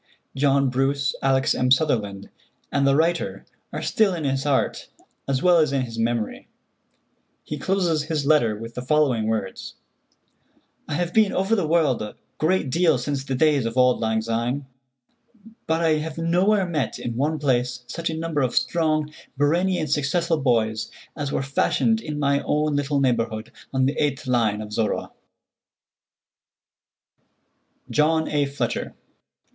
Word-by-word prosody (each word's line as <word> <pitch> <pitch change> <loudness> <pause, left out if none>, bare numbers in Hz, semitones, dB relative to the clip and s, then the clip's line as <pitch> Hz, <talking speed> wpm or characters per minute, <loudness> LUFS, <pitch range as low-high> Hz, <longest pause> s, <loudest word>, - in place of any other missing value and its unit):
John 140 -1 +2
Bruce, 135 +1 0
Alex. 135 0 +2
M. 125 - 0
Sutherland, 110 -8 +1 0.4
and 140 -1 +2
the 135 - +4
writer 165 +3 0 0.3
are - - -5
still 215 -6 +2
in 165 - -4
his 135 -1 -1
heart 140 -2 0 0.4
as 135 -1 -1
well 180 -2 +5
as 155 -3 +2
in 135 -2 0
his 115 -2 -6
memory. 115 -1 -2 1.0
He 150 - -6
closes 175 -5 0
his 155 -3 -2
letter 140 -8 +3
with 115 +2 -8
the 125 - -5
following 130 -5 +1
words: 105 -4 -3 1.1
"I - - -3
have 175 +2 -2
been 215 -3 +4
over 195 +4 +1
the 190 -7 0
world 155 -7 +2
a 105 - -6 0.2
great 160 -4 +1
deal 165 -2 +3
since 135 +2 -3
the 135 -1 -3
days 145 -3 +2
of 115 +2 -5
'Auld 125 0 +4
Lang 110 -1 0
Syne,' 120 +5 -2 1.0
but 160 +1 +1
I 160 -2 +3
have 155 +1 -5
nowhere 185 +5 +2
met 155 -6 -2
in 120 - -5
one 150 +5 0
place 125 -3 0
such 165 +6 -4
a 160 - -3
number 160 -2 -1
of 125 -2 0
strong, 155 -2 +1 0.2
brainy 175 +6 +2
and 155 - -2
successful 160 +3 0
boys 110 -4 +1 0.3
as 145 -2 -3
were - - -1
fashioned 225 - +1
in 150 -5 -5
my 140 -1 +2
own 150 0 0
little 145 0 0
neighborhood 115 -4 -1 0.2
on 130 -1 +1
the 135 - +1
8th 145 -1 -1
line 115 -5 +1
of 105 -1 -8
Zorra." 110 0 -1 2.8
JOHN 160 +1 +2
A. 145 -2 +1
FLETCHER. 140 +1 -3
140 Hz, 155 wpm, -23 LUFS, 125-160 Hz, 2.8 s, well